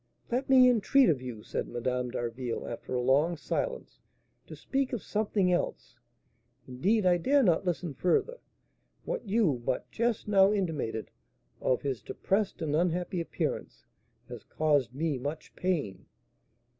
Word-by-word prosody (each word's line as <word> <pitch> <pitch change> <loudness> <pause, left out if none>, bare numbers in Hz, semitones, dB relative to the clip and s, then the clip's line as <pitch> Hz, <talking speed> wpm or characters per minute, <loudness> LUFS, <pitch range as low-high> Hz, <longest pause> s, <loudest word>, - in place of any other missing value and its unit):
"Let 255 +3 -1
me 260 -1 +7
entreat 250 +2 +4
of 140 -6 +1
you," 120 -4 -7
said - - -3
Madame 125 +1 -2
d'Harville, 120 0 -4
after 120 +2 -5
a 125 - 0
long 145 +7 +3
silence, - - -3 0.5
"to - - -9
speak 270 -1 -2
of 235 - -3
something 205 -3 0
else; 175 - -2 0.7
indeed 190 - +1
I 180 -1 +5
dare 275 +9 +3
not 175 -4 +2
listen 175 -3 -2
further: 185 - 0 0.7
what - - -4
you 190 - +2
but 125 - -2
just 235 -2 -1
now 195 -1 +5
intimated 155 - -2 0.5
of 130 - +1
his 135 -6 -2
depressed 195 - -1
and 150 -2 0
unhappy 175 +1 0
appearance 165 - -4 0.4
has - - -9
caused 145 -6 0
me 150 -2 -1
much 145 +5 -6
pain." 145 - -2
170 Hz, 145 wpm, -29 LUFS, 130-210 Hz, 0.7 s, me